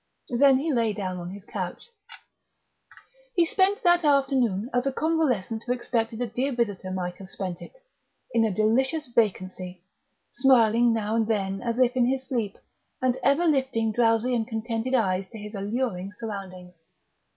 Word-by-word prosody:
Then 265 +1 +5
he 300 +3 -1
lay 230 -3 +1
down 185 -3 -4
on 175 0 -6
his 200 +1 -10
couch. 475 - -6 1.4
He 345 - +4
spent 385 +4 +1
that 350 0 +4
afternoon 265 -8 +2
as 245 +2 +1
a - - +1
convalescent 260 - 0
who 245 - +2
expected 230 -2 -2
a - - 0
dear 245 +5 -2
visitor 205 -6 -2
might 180 -1 -4
have 190 -1 -10
spent 185 -3 -5
it - - -11 0.6
in 230 -1 +3
a 220 - +2
delicious 260 - +1
vacancy, 185 -6 -1 0.5
smiling 235 -3 +4
now 220 -1 -1
and 225 -1 +1
then 195 -3 -1
as 235 -1 -2
if 255 0 +3
in 245 -1 +3
his 260 0 0
sleep, 230 -6 -2 0.4
and 255 -3 +1
ever 280 +7 +3
lifting 260 -7 +1
drowsy 230 +2 +2
and 225 -2 0
contented 230 +3 -2
eyes 190 -5 0
to 225 - -10
his 210 0 -8
alluring 200 -2 -3
surroundings. 185 -5 -8
230 Hz, 160 wpm, -26 LUFS, 200-260 Hz, 1.4 s, Then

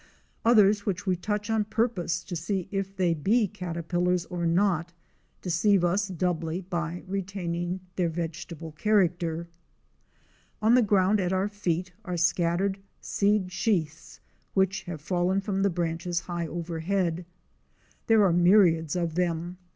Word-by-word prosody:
Others 210 -3 +4
which 185 -2 -2
we 185 -2 +2
touch 210 +3 -3
on 220 -1 +2
purpose 205 -7 -1
to 180 - -6
see 175 +3 -2
if 195 -1 -3
they 180 -3 +2
be 205 +8 +2
caterpillars 180 -1 -1
or 170 -1 -1
not, 170 -1 +1 0.5
deceive 185 +2 +2
us 195 +3 +1
doubly 175 -2 -2
by 175 -1 -4
retaining 185 -2 -3 0.2
their 175 -2 +1
vegetable 165 -1 -5
character. 170 -2 +1 1.1
On 220 +2 +4
the 250 - +6
ground 200 -1 +3
at 180 -1 0
our 190 +1 +1
feet 185 -3 -2
are 180 -3 -3
scattered 175 +3 +1 0.2
seed 200 -2 +1
sheaths 170 -6 -2 0.4
which 190 0 +1
have 165 -4 -6
fallen 180 +4 +1
from 195 -1 -2
the 200 - +3
branches 170 0 -2
high 175 -2 -4
overhead. 170 +1 -2 0.8
There 225 -2 +5
are 180 - +3
myriads 175 -3 +4
of 170 -2 -1
them. 175 +1 -2
180 Hz, 135 wpm, -27 LUFS, 170-195 Hz, 1.1 s, the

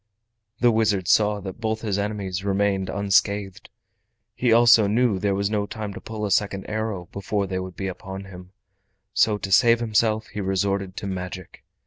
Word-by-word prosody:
The 120 -1 +5
wizard 105 -5 +1
saw 105 -1 +3
that 95 +3 -8
both 110 0 -1
his 105 -3 -1
enemies 100 -3 -3
remained 100 -1 0
unscathed. 100 -1 0 0.6
He 125 +1 +1
also 115 -2 +6
knew 115 +2 +2
that 95 - -2
there 100 0 0
was 100 +1 -1
no 105 -1 -1
time 105 -2 -6
to - - -9
pull 110 -1 -5
a 100 - -3
second 100 0 0
arrow 110 -5 -3
before 100 +1 -2
they 95 -1 -3
would 95 -1 -7
be 95 - -5
upon 95 +1 -6
him, 90 -1 -12 0.6
so 110 -1 +3
to 100 -1 -6
save 115 +3 +5
himself 110 -1 +1
he 105 - -5
resorted 95 0 -1
to - - -5
magic. 95 -1 -6
100 Hz, 180 wpm, -24 LUFS, 95-110 Hz, 0.6 s, also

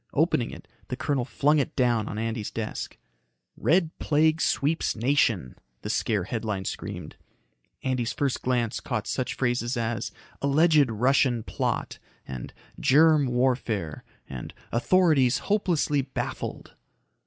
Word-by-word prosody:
Opening - - +2
it, - - -11 0.2
the - - -3
colonel 135 -4 -1
flung 150 +3 +2
it 135 - -2
down 120 -4 +2
on 105 - -5
Andy's 115 -1 -2
desk. 110 -2 -5 0.6
"RED 165 0 +2
PLAGUE 155 +1 +2
SWEEPS 150 +4 +1
NATION," 115 - +1 0.3
the - - -2
scare 105 -4 0
headline 105 -1 -3
screamed. - - -6 0.7
Andy's 125 -2 0
first 140 -3 -1
glance 120 -2 0
caught 115 -5 -3
such 130 - -2
phrases 120 -1 0
as 115 0 -2 0.3
"alleged 150 0 +4
Russian 120 +1 +2
plot" - - -2 0.3
and 65 -2 -6 0.3
"germ 155 0 +5
warfare" 120 - 0 0.2
and 65 -2 -7 0.2
"authorities 135 -1 +3
hopelessly 175 -8 +1
baffled." 135 0 -5
125 Hz, 120 wpm, -26 LUFS, 115-145 Hz, 0.7 s, germ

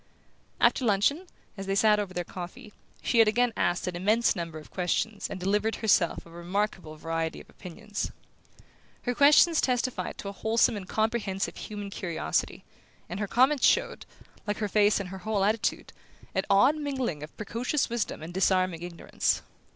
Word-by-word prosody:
After - - +3
luncheon, 245 - +2 0.3
as 195 -2 -7
they 195 - 0
sat 210 +1 +4
over 200 -3 -3
their 180 -1 -3
coffee, 180 +3 -9 0.3
she 235 - +2
had 225 - +7
again 240 +2 +2
asked 175 +1 0
an 180 -1 -3
immense 215 +7 +2
number 165 -3 -5
of 155 - -12
questions 200 +4 -1
and 190 - -6
delivered 205 +4 0
herself 190 -6 +2
of 165 - -15
a - - -10
remarkable 180 -2 -2
variety 165 +1 -3
of - - -14
opinions. 205 +3 -6 0.9
Her 245 - 0
questions 300 +5 +6
testified 250 0 -1
to - - -7
a - - -3
wholesome 220 +3 +2
and 190 -3 -7
comprehensive 215 -3 -1
human 205 -2 -7
curiosity, 170 - -2 0.5
and 180 +3 -5
her 205 - -1
comments 260 +5 +4
showed, - - +1 0.4
like 205 - -1
her 210 - -1
face 210 +1 +3
and 195 -2 -5
her 190 +1 -7
whole 205 0 -1
attitude, 220 +2 -1 0.4
an 190 - 0
odd 255 +10 +5
mingling 265 - -2
of 150 - -10
precocious 235 +7 -1
wisdom 230 -8 -3
and 165 +2 -7
disarming 185 -2 +1
ignorance. 175 -1 -1
205 Hz, 170 wpm, -28 LUFS, 180-225 Hz, 0.9 s, had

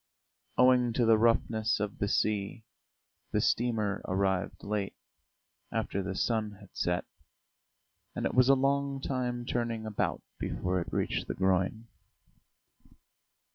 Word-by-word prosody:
Owing 125 -1 +5
to 120 0 +2
the 115 0 +6
roughness 110 -1 +2
of 105 -1 -3
the 100 - +1
sea, 105 +2 0 0.7
the - - +2
steamer 110 -4 +1
arrived 95 0 -1
late, 100 -1 -2 0.8
after 100 - -1
the 95 0 -4
sun 110 -1 0
had 100 -1 -16
set, 90 0 0 1.1
and - - -2
it - - 0
was 125 +1 +5
a 135 - +8
long 140 +1 +1
time 125 -3 -2
turning 115 -2 -2
about 110 -2 -2 0.2
before 90 0 -1
it - - -6
reached - - -1
the - - -3
groyne. 95 +4 +1
110 Hz, 130 wpm, -30 LUFS, 100-120 Hz, 1.1 s, a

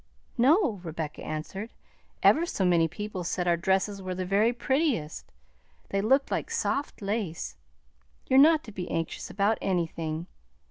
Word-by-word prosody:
"No," 255 - +3
Rebecca 160 -2 -5
answered. 190 +9 -5 0.5
"Ever 340 +2 +5
so 195 - -1
many 170 -2 +4
people 190 +2 -5
said 180 +1 -2
our 170 - +4
dresses 190 +3 0
were 185 -1 -4
the 185 0 -3
very 205 +5 +3
prettiest; 255 - -1 0.6
they 195 - 0
looked 265 +6 +2
like - - -1
soft 290 - -2
lace. 200 -5 -3 0.7
You're 265 - +5
not 315 +2 +6
to 220 - -10
be 185 -3 -6
anxious 165 -1 -3
about 205 +2 +1
anything. 165 -3 -2
195 Hz, 145 wpm, -28 LUFS, 170-240 Hz, 0.7 s, not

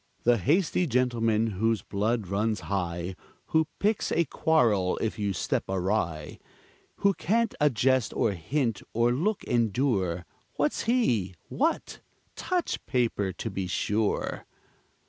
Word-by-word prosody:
The 120 -1 +4
hasty 170 - +2
gentleman, 115 -4 +2
whose 110 +1 0
blood 105 +2 -1
runs 105 +2 0
high, 90 -2 -3 0.3
Who 160 -1 +3
picks 210 +1 0
a 170 - +2
quarrel 115 -13 +2
if 110 -1 -2
you 100 -1 0
step 95 - -1
awry, 90 -5 -1 0.6
Who 200 0 +4
can't 230 +4 +1
a 150 - +6
jest, 130 0 +2
or - - +2
hint, 115 - -1
or 120 +1 +3
look 180 - 0
endure, 105 -7 0 0.3
What's 145 0 0
he? 120 - +1
What? 320 +4 -1 0.4
Touch 360 -2 -2
paper, 115 -6 0
to 115 - -4
be 95 -1 -3
sure. 105 +3 -1
115 Hz, 125 wpm, -28 LUFS, 100-145 Hz, 0.6 s, a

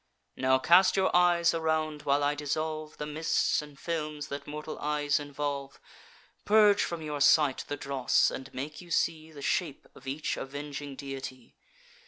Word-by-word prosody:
Now 130 0 +3
cast 180 +8 +5
your 190 -2 +2
eyes 175 -1 +4
around, 160 -2 -1
while 145 0 +1
I 145 +1 +2
dissolve 155 +1 -3
The 150 - -4
mists 155 +1 +1
and 150 -1 -12
films 155 -3 -4
that 140 +1 -6
mortal 150 +1 -6
eyes 150 -1 0
involve, 145 -1 -4 0.6
Purge 210 -1 +5
from 170 -2 -3
your 150 -2 -4
sight 145 -1 +4
the 145 - -4
dross, 135 -2 +2
and 130 +1 -7
make 145 +6 -6
you 175 - -14
see 160 -1 0
The 145 -2 -10
shape 160 -7 -1
of 135 - -15
each 145 +3 -2
avenging 145 0 -6
deity. 135 -2 -8
150 Hz, 160 wpm, -29 LUFS, 140-160 Hz, 0.6 s, cast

